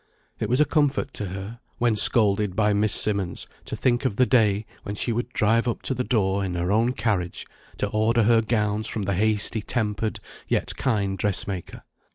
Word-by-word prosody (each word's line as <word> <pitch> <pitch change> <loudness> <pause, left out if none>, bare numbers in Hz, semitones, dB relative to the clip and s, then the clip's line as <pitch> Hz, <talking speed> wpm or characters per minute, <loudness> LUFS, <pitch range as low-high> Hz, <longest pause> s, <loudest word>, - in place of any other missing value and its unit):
It 105 - -2
was 125 +3 +2
a 150 - +5
comfort 145 -3 0
to 105 - -4
her, 95 +5 -7 0.2
when 120 -2 +1
scolded 105 -2 +5
by 105 0 +2
Miss 105 +1 +1
Simmonds, 100 -4 0 0.2
to - - -5
think 120 0 0
of 130 -7 -1
the 130 - +3
day 110 -4 +2 0.2
when 100 - -6
she 115 +3 -1
would 120 +2 -3
drive 115 0 +1
up 120 - -3
to - - -1
the 125 0 -2
door 100 -5 0
in 90 -2 -3
her 90 +2 -1
own 115 +4 +2
carriage, 105 -7 -2 0.3
to 105 - -1
order 110 +2 +1
her 115 +1 +4
gowns 110 -1 -1
from 105 - -4
the 100 +1 -1
hasty 110 +2 +1
tempered 110 -1 -2 0.3
yet - - -1
kind 100 -7 -1
dressmaker. 95 -2 -2
110 Hz, 195 wpm, -24 LUFS, 100-115 Hz, 0.3 s, a